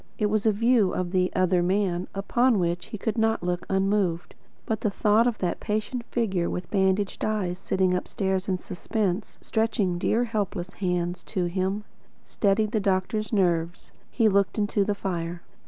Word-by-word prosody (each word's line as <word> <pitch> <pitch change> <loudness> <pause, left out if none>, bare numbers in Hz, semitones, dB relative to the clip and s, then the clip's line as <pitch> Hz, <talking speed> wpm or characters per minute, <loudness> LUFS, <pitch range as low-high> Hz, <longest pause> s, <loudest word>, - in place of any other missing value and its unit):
It 210 -2 +1
was 215 0 +1
a - - +6
view 225 -1 +3
of 180 -1 -2
"the 185 -1 +2
other 185 -1 +3
man" 185 -1 0
upon 235 +4 +2
which 175 -1 -1
he 215 - -6
could 220 +3 -2
not 220 -3 +1
look 180 0 -2
unmoved. 190 -3 0 0.3
But 220 - -2
the 210 - +1
thought 210 +3 +3
of 235 -3 0
that 180 -2 -2
patient 220 +3 -2
figure 195 -9 0
with 180 -1 -5
bandaged 195 0 +1
eyes 190 -5 -1
sitting 190 -1 +1
upstairs 190 +1 -1
in 185 - +1
suspense, 195 +2 -3
stretching 210 -5 0
dear 230 +6 +2
helpless 205 -5 -3
hands 180 -2 -1
to 185 -4 -1
him, 190 +3 -1 0.4
steadied 210 +1 +1
the 220 - +1
doctor's 195 +2 0
nerve. 175 -4 0 0.2
He 225 -3 +2
looked 200 -1 +2
into 205 -1 +1
the 205 +1 -1
fire. 175 -3 -4
195 Hz, 170 wpm, -26 LUFS, 180-215 Hz, 0.4 s, a